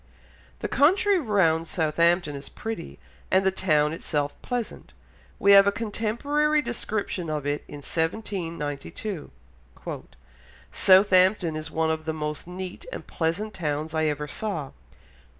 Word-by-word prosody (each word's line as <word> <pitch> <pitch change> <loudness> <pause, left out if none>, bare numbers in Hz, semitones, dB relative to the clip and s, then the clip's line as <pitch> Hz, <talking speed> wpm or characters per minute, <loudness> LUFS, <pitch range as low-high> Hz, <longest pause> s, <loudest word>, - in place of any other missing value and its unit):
The - - -1
country 380 +7 +4
round 175 - +2
Southampton 165 0 +2
is 140 - -8
pretty, 220 -6 -6 0.3
and 190 0 +3
the 190 - +4
town 155 -5 +2
itself 145 -3 -2
pleasant; 245 -3 -4 0.4
we 200 - +4
have 200 0 +8
a - - +5
contemporary 235 +8 0
description 205 -7 -3
of 150 -2 -2
it 145 +1 -1
in 145 -1 -9
1792. 165 -1 -3 1.4
"Southampton 185 -2 +5
is 155 0 -5
one 160 0 0
of 160 0 -3
the 160 - -1
most 150 +1 -4
neat 180 0 -6
and - - -6
pleasant 180 +6 -2
towns 155 -1 -3
I 160 0 +1
ever 150 -1 -1
saw 160 -6 -3
170 Hz, 130 wpm, -26 LUFS, 155-210 Hz, 1.4 s, have